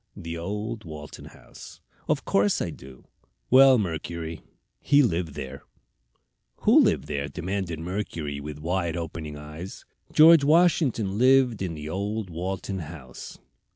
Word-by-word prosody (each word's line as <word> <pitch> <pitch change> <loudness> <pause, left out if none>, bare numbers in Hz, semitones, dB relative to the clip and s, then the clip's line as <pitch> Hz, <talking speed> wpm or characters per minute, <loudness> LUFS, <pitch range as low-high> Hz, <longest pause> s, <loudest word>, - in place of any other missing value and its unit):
"The 85 0 -6
old 105 +6 -4
Walton 75 -3 -9
House." - - -14 0.3
"Of - - 0
course 100 +1 +2
I - - -2
do." 65 -1 -13 0.5
"Well, 130 0 +8
Mercury, 85 -4 -4 0.4
he 145 0 +4
lived 85 - -1
there." 70 -3 -7 1.0
"Who - - +6
lived 70 - +2
where?" 70 -1 -3
demanded 90 0 -4
Mercury, 85 -5 -4
with 75 0 -7
wide 85 +1 -2
opening 80 -3 -6
eyes. 75 +5 -9 0.3
"George 160 -1 +7
Washington 140 - +2
lived 130 -4 +4
in 90 -4 -3
the 75 0 -7
old 100 +3 -3
Walton 95 +3 -4
House." 75 -6 -9
85 Hz, 130 wpm, -26 LUFS, 80-105 Hz, 1.0 s, Well